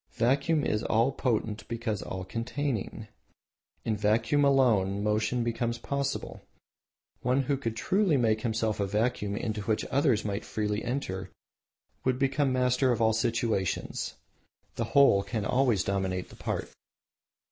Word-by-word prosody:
Vacuum 140 Hz, +5 st, +2 dB
is 105 Hz, -, 0 dB
all 115 Hz, +3 st, +2 dB
potent 110 Hz, -5 st, -1 dB
because 115 Hz, -3 st, -3 dB
all 95 Hz, 0 st, -5 dB
containing. 115 Hz, +2 st, -3 dB, 0.8 s
In 110 Hz, -, +1 dB
vacuum 110 Hz, +8 st, +2 dB
alone 110 Hz, -8 st, +3 dB
motion 110 Hz, +3 st, +1 dB
becomes 120 Hz, 0 st, -1 dB
possible. 140 Hz, +3 st, -3 dB, 0.8 s
One 130 Hz, +2 st, +2 dB
who 140 Hz, +2 st, 0 dB
could 115 Hz, -4 st, -4 dB, 0.4 s
make 110 Hz, -2 st, +2 dB
of -, -, -11 dB
himself 110 Hz, -2 st, -1 dB
a 100 Hz, -, 0 dB
vacuum 105 Hz, 0 st, 0 dB
into 110 Hz, -2 st, -2 dB
which 105 Hz, +2 st, -1 dB
others 130 Hz, -6 st, +2 dB
might 100 Hz, 0 st, -2 dB
freely 105 Hz, 0 st, -2 dB
enter 95 Hz, -7 st, -3 dB, 0.7 s
would 130 Hz, -1 st, +1 dB
become 135 Hz, +1 st, +1 dB
master 125 Hz, 0 st, +2 dB
of 120 Hz, -, 0 dB
all 110 Hz, -1 st, +3 dB
situations. 110 Hz, -4 st, -1 dB, 0.6 s
The 115 Hz, -, -2 dB
whole 135 Hz, -8 st, +7 dB
can 105 Hz, +1 st, -3 dB
always 125 Hz, -5 st, +2 dB
dominate 95 Hz, -2 st, -2 dB
the -, -, -13 dB
part. -, -, -4 dB
115 Hz, 135 wpm, -29 LUFS, 105-130 Hz, 0.8 s, whole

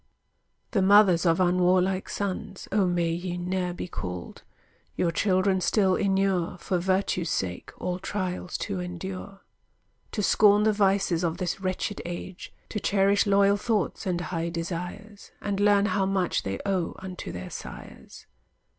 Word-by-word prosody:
The 200 Hz, -, +2 dB
mothers 190 Hz, -3 st, +5 dB
of 165 Hz, +1 st, +3 dB
unwarlike 185 Hz, +1 st, +2 dB
sons 195 Hz, -1 st, -4 dB
O 200 Hz, -2 st, +3 dB
may 175 Hz, -2 st, +1 dB
ye 175 Hz, +1 st, -3 dB
ne'er 180 Hz, 0 st, -2 dB
be 175 Hz, -, -5 dB
called! 90 Hz, -, -6 dB, 0.5 s
Your 170 Hz, -, +1 dB
children 190 Hz, +1 st, +2 dB
still 190 Hz, +1 st, +3 dB
inure 195 Hz, -3 st, +1 dB
For 185 Hz, 0 st, -1 dB
virtue's 185 Hz, -2 st, 0 dB
sake 90 Hz, -2 st, -3 dB
all 180 Hz, 0 st, -3 dB
trials 185 Hz, -2 st, -3 dB
to 200 Hz, -2 st, -3 dB
endure; 185 Hz, +2 st, -6 dB, 0.7 s
To 210 Hz, -, -1 dB
scorn 205 Hz, +1 st, +5 dB
the 215 Hz, 0 st, +3 dB
vices 195 Hz, -4 st, +2 dB
of 165 Hz, -1 st, 0 dB
this 180 Hz, +1 st, -3 dB
wretched 185 Hz, +2 st, -2 dB
age; 175 Hz, +1 st, -7 dB, 0.2 s
To 210 Hz, -, -3 dB
cherish 200 Hz, +1 st, +2 dB
loyal 200 Hz, 0 st, +4 dB
thoughts, 210 Hz, -3 st, -1 dB
and 175 Hz, -2 st, 0 dB
high 170 Hz, 0 st, -3 dB
desires; 180 Hz, +5 st, -6 dB
And 200 Hz, -1 st, -2 dB
learn 205 Hz, 0 st, +4 dB
how 200 Hz, -2 st, +1 dB
much 190 Hz, -2 st, 0 dB
they 95 Hz, 0 st, -3 dB
owe 190 Hz, -4 st, -1 dB
unto 185 Hz, -1 st, -7 dB
their 90 Hz, 0 st, -7 dB
sires. -, -, -10 dB
185 Hz, 145 wpm, -27 LUFS, 175-200 Hz, 0.7 s, mothers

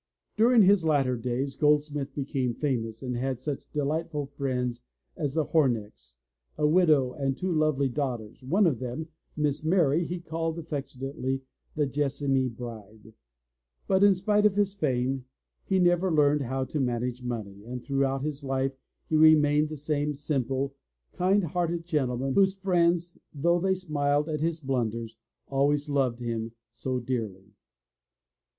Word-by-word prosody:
During 230 Hz, 0 st, +6 dB
his 195 Hz, -2 st, +5 dB
latter 140 Hz, -5 st, +2 dB
days 125 Hz, +3 st, -2 dB
Goldsmith 150 Hz, -2 st, +1 dB
became 135 Hz, -3 st, -1 dB
famous 115 Hz, -5 st, -2 dB
and 125 Hz, -1 st, -3 dB
had 130 Hz, +1 st, -1 dB
such 140 Hz, +2 st, -5 dB
delightful 150 Hz, +1 st, -1 dB
friends 130 Hz, -3 st, -3 dB, 0.3 s
as 145 Hz, -1 st, -3 dB
the 160 Hz, -, +2 dB
Homecks, 105 Hz, -, -1 dB, 0.4 s
a 150 Hz, -, +1 dB
widow 150 Hz, -5 st, +4 dB
and 135 Hz, -1 st, -2 dB
two 185 Hz, 0 st, -2 dB
lovely 155 Hz, -3 st, +2 dB
daugh 130 Hz, -1 st, -1 dB
ters, 110 Hz, +2 st, -14 dB
one 185 Hz, +11 st, +3 dB
of 150 Hz, -9 st, +1 dB
whom. 130 Hz, +6 st, -5 dB, 0.3 s
Miss 150 Hz, 0 st, 0 dB
Mary, 160 Hz, -2 st, +3 dB
he 175 Hz, 0 st, -4 dB
called 165 Hz, 0 st, -3 dB
affectionately, 135 Hz, -3 st, -4 dB, 0.3 s
the 150 Hz, -1 st, +2 dB
Jes 140 Hz, 0 st, -1 dB
samy 135 Hz, -2 st, +1 dB
bride. 110 Hz, -2 st, -10 dB, 0.7 s
But 190 Hz, 0 st, +3 dB
in 200 Hz, -1 st, +6 dB
spite 210 Hz, +3 st, +3 dB
of 200 Hz, -, -2 dB
his 200 Hz, -1 st, +1 dB
fame, 130 Hz, -6 st, -1 dB, 0.4 s
he 190 Hz, -, +1 dB
never 175 Hz, 0 st, +3 dB
learned 150 Hz, -1 st, +3 dB
how 130 Hz, +1 st, -2 dB
to 150 Hz, +4 st, -3 dB
manage 125 Hz, -1 st, -1 dB
money, 105 Hz, -5 st, -5 dB
and 125 Hz, +2 st, -7 dB
throughout 135 Hz, -1 st, 0 dB
his 150 Hz, -1 st, -4 dB
life 135 Hz, 0 st, -1 dB, 0.3 s
he 155 Hz, -, 0 dB
remained 155 Hz, -1 st, +5 dB
the 155 Hz, -, -6 dB
same 150 Hz, 0 st, -1 dB
simple, 135 Hz, -1 st, -1 dB, 0.4 s
kind 190 Hz, +2 st, +2 dB
hearted 170 Hz, 0 st, -1 dB
gentleman 135 Hz, -5 st, 0 dB
whose 195 Hz, +2 st, +3 dB
friends, 175 Hz, -2 st, +1 dB, 0.2 s
though 170 Hz, +5 st, +2 dB
they 190 Hz, +1 st, +1 dB
smiled 150 Hz, -4 st, 0 dB
at 150 Hz, -1 st, -2 dB
his 165 Hz, 0 st, -1 dB
blunders, 115 Hz, -4 st, -2 dB, 0.3 s
always 145 Hz, +2 st, +1 dB
loved 130 Hz, -4 st, 0 dB
him 115 Hz, -1 st, -3 dB, 0.2 s
so 125 Hz, +2 st, -3 dB
dearly. 110 Hz, -6 st, -4 dB
140 Hz, 150 wpm, -28 LUFS, 125-160 Hz, 0.7 s, During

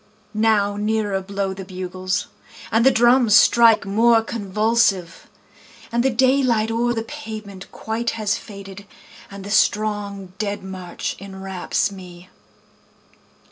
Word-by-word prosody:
Now 210 Hz, -2 st, +2 dB
nearer 210 Hz, -2 st, -1 dB
blow 195 Hz, 0 st, -3 dB
the 190 Hz, 0 st, -8 dB
bugles, 185 Hz, +1 st, -4 dB, 0.5 s
And 225 Hz, +1 st, +3 dB
the 265 Hz, -, +7 dB
drums 240 Hz, -3 st, +4 dB
strike 230 Hz, -3 st, +5 dB
more 225 Hz, +3 st, +3 dB
convulsive, 210 Hz, -4 st, 0 dB, 0.6 s
And 235 Hz, 0 st, +1 dB
the 265 Hz, -, +2 dB
daylight 255 Hz, -3 st, +2 dB
oâer 240 Hz, +1 st, 0 dB
the 225 Hz, -, -2 dB
pavement 220 Hz, -8 st, -9 dB
quite 225 Hz, +2 st, -3 dB
has 210 Hz, -2 st, 0 dB
faded, 200 Hz, -1 st, -10 dB, 0.4 s
And 200 Hz, -1 st, -9 dB
the 200 Hz, -, -7 dB
strong 205 Hz, -3 st, 0 dB
dead 205 Hz, -2 st, -3 dB
march 185 Hz, -2 st, -6 dB
enwraps 190 Hz, 0 st, -3 dB
me. 180 Hz, -2 st, -12 dB
205 Hz, 120 wpm, -21 LUFS, 195-225 Hz, 0.6 s, the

